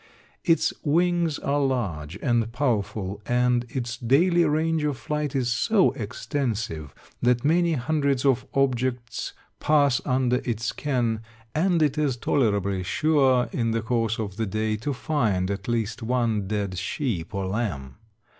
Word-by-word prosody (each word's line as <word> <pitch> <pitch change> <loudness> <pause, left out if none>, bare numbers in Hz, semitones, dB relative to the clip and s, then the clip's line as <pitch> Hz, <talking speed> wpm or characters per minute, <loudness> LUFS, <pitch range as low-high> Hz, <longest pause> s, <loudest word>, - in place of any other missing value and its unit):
Its 165 -2 +3
wings 170 0 +2
are 145 +1 0
large 100 - -1
and 120 -3 +1
powerful, 105 -6 -1
and 125 0 +2
its 120 -2 -4
daily 170 +8 +3
range 160 +1 +1
of 145 -3 -1
flight 150 +1 -3
is 125 -3 +1
so 190 - +3
extensive 110 - -3 0.3
that 120 +1 +2
many 170 +2 +3
hundreds 140 -1 0
of 130 -2 +2
objects 125 -2 -1 0.3
pass 145 -4 +3
under 125 -1 +1
its 115 -3 -2
ken, 120 -6 -1 0.3
and 170 0 +2
it 150 0 +1
is 140 -5 +1
tolerably 100 -8 +1
sure, 135 - +2
in 115 -2 0
the 115 0 0
course 115 -1 0
of 105 -4 -4
the 110 -1 -1
day, 110 +2 -1
to 120 +7 -3
find 110 -10 0
at 100 -1 -5
least 115 0 -1
one 115 -4 0
dead 100 -3 -2
sheep 95 - -3
or 100 -1 -1
lamb. 95 - -3
125 Hz, 145 wpm, -25 LUFS, 110-145 Hz, 0.3 s, Its